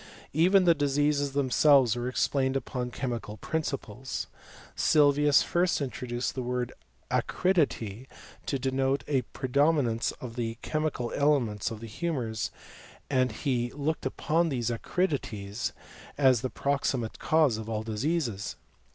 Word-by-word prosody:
Even 185 Hz, +5 st, +5 dB
the 175 Hz, -2 st, +6 dB
diseases 145 Hz, -1 st, +1 dB
themselves 135 Hz, -3 st, +4 dB
were 120 Hz, 0 st, -3 dB
ex 130 Hz, -, +1 dB
plained 135 Hz, -1 st, 0 dB
upon 125 Hz, -2 st, -4 dB
chemical 120 Hz, -4 st, -4 dB
principles. 135 Hz, -5 st, -3 dB, 0.5 s
Sylvius 145 Hz, -1 st, +4 dB
first 175 Hz, +1 st, +1 dB
intro 130 Hz, -2 st, -4 dB
duced 120 Hz, +1 st, -2 dB
the 130 Hz, -, -3 dB
word 125 Hz, 0 st, -2 dB, 0.4 s
acridity 135 Hz, -, 0 dB, 0.4 s
to 140 Hz, -, 0 dB
denote 135 Hz, +1 st, 0 dB
a 135 Hz, -3 st, +2 dB
predominance 135 Hz, -3 st, +1 dB
of 120 Hz, -3 st, -9 dB
the 115 Hz, -1 st, -2 dB
chemical 155 Hz, -6 st, -2 dB
elements 130 Hz, -8 st, +1 dB
of 110 Hz, -1 st, -7 dB
the -, -, -6 dB
humours, 115 Hz, -3 st, -2 dB, 0.6 s
and 130 Hz, -2 st, +2 dB
he 120 Hz, 0 st, -1 dB
looked 145 Hz, 0 st, -1 dB
upon 165 Hz, +5 st, +1 dB
these 120 Hz, -4 st, -1 dB
acridities 115 Hz, -, -2 dB, 0.5 s
as 130 Hz, -5 st, +4 dB
the 130 Hz, -, -2 dB
proximate 135 Hz, -5 st, -1 dB
cause 155 Hz, -8 st, +3 dB
of 110 Hz, 0 st, -6 dB
all 110 Hz, -1 st, -2 dB
diseases. 115 Hz, -, -2 dB
130 Hz, 130 wpm, -28 LUFS, 120-145 Hz, 0.6 s, the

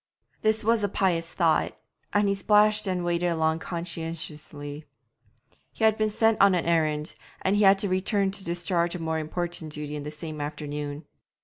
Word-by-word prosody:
This 220 Hz, +1 st, +2 dB
was 225 Hz, 0 st, +2 dB
a 205 Hz, -, +1 dB
pious 170 Hz, -4 st, 0 dB
thought, 165 Hz, -3 st, +1 dB, 0.3 s
and 205 Hz, 0 st, +3 dB
he 200 Hz, -, +2 dB
splashed 210 Hz, +1 st, +3 dB
and 180 Hz, -2 st, -1 dB
waded 175 Hz, 0 st, +1 dB
along 160 Hz, -1 st, +1 dB
conscientiously. 160 Hz, -4 st, -6 dB, 0.9 s
He -, -, -5 dB
had 220 Hz, -1 st, +5 dB
been 215 Hz, 0 st, +1 dB
sent 225 Hz, +1 st, +2 dB
on 200 Hz, -2 st, +6 dB
an 175 Hz, -, 0 dB
errand, 155 Hz, -2 st, +1 dB, 0.3 s
and 190 Hz, +2 st, +2 dB
had 200 Hz, -1 st, +6 dB
to 200 Hz, -, 0 dB
return 195 Hz, +1 st, +1 dB
to 195 Hz, 0 st, -3 dB
discharge 170 Hz, 0 st, 0 dB
a -, -, -4 dB
more 160 Hz, -1 st, -1 dB
important 160 Hz, 0 st, -4 dB
duty 150 Hz, 0 st, -5 dB
in 150 Hz, -, -4 dB
the 145 Hz, -, -5 dB
same 155 Hz, 0 st, -6 dB
afternoon. 145 Hz, 0 st, -5 dB
170 Hz, 175 wpm, -26 LUFS, 155-200 Hz, 0.9 s, on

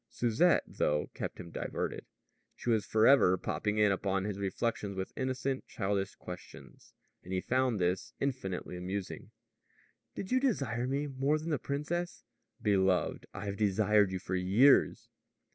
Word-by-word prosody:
Susette, 125 Hz, +10 st, +3 dB
though, 75 Hz, 0 st, -1 dB
kept -, -, -5 dB
him 85 Hz, -2 st, -8 dB
diverted. -, -, -4 dB, 0.5 s
She 120 Hz, -, -2 dB
was 110 Hz, -2 st, +1 dB
forever 110 Hz, -4 st, +5 dB
popping 105 Hz, +2 st, -2 dB
in 105 Hz, -1 st, +4 dB
upon 95 Hz, 0 st, 0 dB
his 100 Hz, -1 st, -3 dB
reflections 100 Hz, 0 st, -2 dB
with 95 Hz, -, -4 dB
innocent, 130 Hz, 0 st, -2 dB
childish 95 Hz, 0 st, -2 dB
questions; 90 Hz, 0 st, -11 dB, 0.3 s
and 90 Hz, -, -10 dB
he 95 Hz, -, +1 dB
found 130 Hz, +1 st, +1 dB
this 90 Hz, +1 st, 0 dB
infinitely 95 Hz, -10 st, -3 dB
amusing. 95 Hz, +2 st, -5 dB, 0.9 s
"Did 190 Hz, -, -6 dB
you 255 Hz, -, +4 dB
desire 135 Hz, -, 0 dB
me 140 Hz, +2 st, -1 dB
more 140 Hz, +2 st, 0 dB
than 160 Hz, +2 st, -4 dB
the 150 Hz, -, 0 dB
princess?" 160 Hz, +7 st, -3 dB, 0.4 s
"Beloved, 95 Hz, -3 st, +1 dB
I 100 Hz, +1 st, -7 dB
have 100 Hz, -1 st, -3 dB
desired 105 Hz, -1 st, +3 dB
you 95 Hz, -, -2 dB
for 90 Hz, -, -6 dB
years." 100 Hz, +10 st, +4 dB
105 Hz, 145 wpm, -32 LUFS, 95-130 Hz, 0.9 s, forever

